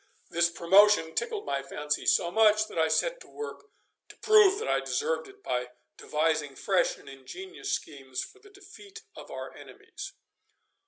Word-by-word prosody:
This 170 0 +3
promotion 170 0 +4
tickled 445 -3 -2
my 140 - -1
fancy 150 +2 -3
so 170 - +3
much, 215 +1 +4
that 170 - -5
I 160 - +4
set - - 0
to - - -14
work 440 -1 -8 0.4
to - - -14
prove 425 -3 +6
that 455 - -4
I - - +2
deserved 475 -1 -2
it 395 0 -17
by 125 0 -2 0.3
devising 155 -2 -1
fresh 190 +4 +1
and - - -18
ingenious 370 - -8
schemes 135 -4 -4
for 405 - -13
the 405 0 -18
defeat 400 +2 -14
of - - -11
our - - -7
enemies. 390 -1 -10
215 Hz, 165 wpm, -28 LUFS, -, 0.4 s, prove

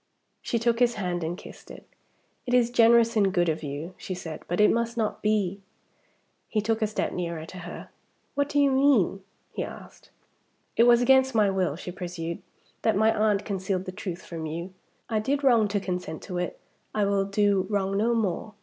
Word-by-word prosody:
She 235 - -1
took 230 0 +1
his 240 -1 +3
hand, 180 -4 -2
and 170 +2 -3
kissed - - -13
it. - - -11 0.6
"It 250 - +2
is 240 -1 +3
generous 230 0 +5
and 200 -3 +3
good 175 -2 +2
of 160 - -1
you," 150 +5 -5
she 185 - -5
said; 165 -3 -7
"but 175 - -2
it 210 - +6
must 235 0 -1
not 220 -2 -1
be." 205 -2 0 0.9
He 215 - 0
took 220 +2 0
a 215 - +2
step 215 - -2
nearer 170 -3 -4
to 180 +2 -10
her. 175 0 -8 0.4
"What 285 0 0
do 290 - +1
you 280 -1 +4
mean?" 265 -8 +3 0.3
he - - -2
asked. - - -11 0.7
"It 235 - +5
was 240 0 +6
against 265 0 +4
my 210 -3 +4
will," 185 -6 0
she 180 +1 -7
pursued, 175 -2 -5 0.4
"that 220 -3 +2
my 220 +2 +3
aunt 210 -1 +1
concealed 190 -2 -2
the 185 - -5
truth 185 -2 -6
from 165 -2 -5
you. 170 +4 -5 0.3
I 220 -2 0
did 275 +6 -1
wrong 235 -5 +5
to 205 0 -1
consent 180 -4 -4
to 180 -2 -4
it, 180 - -4 0.4
I 210 -1 +2
will 200 -1 +1
do 200 -1 +1
wrong 195 -2 0
no 230 +4 +2
more. 215 0 -2
200 Hz, 200 wpm, -26 LUFS, 180-230 Hz, 0.9 s, it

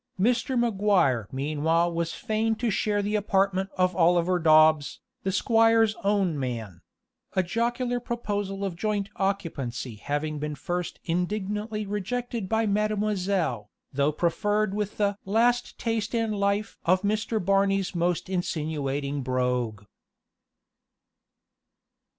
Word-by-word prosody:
Mr. 245 +4 +1
Maguire 195 - +2
meanwhile 155 +5 +1
was 165 0 -1
fain 220 +1 0
to 225 0 -1
share 205 0 0
the 205 +1 -2
apartment 195 -2 +1
of 185 -1 +2
Oliver 175 +1 +3
Dobbs, 155 -2 +4 0.2
the 195 - -1
squire's 225 +2 +4
own 195 -6 +1
man; 115 -9 -4 0.5
a 185 - +3
jocular 240 +5 -1
proposal 205 -5 -3
of 190 -3 -3
joint 205 +1 -1
occupancy 140 - -2
having 145 +5 -3
been 150 0 -3
first 175 +5 -4
indignantly 210 +5 -2
rejected 210 +1 -3
by 225 0 +2
"Mademoiselle," 200 - 0 0.2
though 140 +2 +2
preferred 205 +6 0
with 210 0 -3
the 205 -1 0
"laste 240 +5 +1
taste 225 -1 -2
in 225 -1 0
life" 200 0 -1
of 185 +3 +2
Mr. 215 +2 0
Barney's 195 0 +1
most 175 0 0
insinuating 145 -6 -2
brogue. 125 -4 -1
195 Hz, 115 wpm, -26 LUFS, 160-215 Hz, 0.5 s, Dobbs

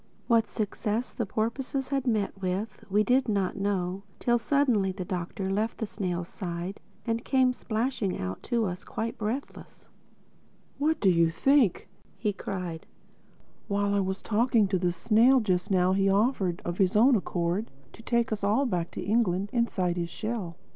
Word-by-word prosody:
What 230 -2 +3
success 215 +2 -2
the 230 -5 -2
porpoises 260 +5 -2
had 270 -2 -1
met 205 -4 0
with, 190 +3 -3
we 205 +2 +3
did 255 +2 +2
not 200 -3 0
know, 195 -2 -1 0.2
till 240 -1 +2
suddenly 235 -7 +2
the 185 -1 -5
Doctor 185 +1 -3
left 215 +3 -1
the 220 - -2
snail's 180 -4 -3
side 180 0 -5 0.3
and 230 0 -1
came 260 -2 +3
splashing 225 -4 -2
out 95 0 -4
to 235 -3 +2
us, 180 -1 -4
quite 225 +1 -4
breathless. 225 +6 -5 0.9
"What 310 +2 +1
do 195 - +4
you 170 -1 +4
think?" 245 - +3 0.3
he 210 -2 -1
cried, 180 -4 -5 0.8
"while 200 0 0
I 200 - +2
was 190 0 -2
talking 230 -1 +3
to 190 -2 +1
the 175 -1 +1
snail 235 +8 +4
just 185 -6 0
now 185 -1 +3
he 195 0 +3
offered, 195 -4 +1
of 175 +2 -3
his 190 0 +3
own 245 +5 +6
accord, 180 +1 -1 0.2
to - - -13
take 235 0 0
us 210 -2 -2
all 215 +8 +3
back 175 -8 -1
to - - -4
England 200 -3 +1
inside 190 -7 0
his 170 -1 -2
shell. 210 -3 -4
205 Hz, 170 wpm, -28 LUFS, 185-235 Hz, 0.9 s, own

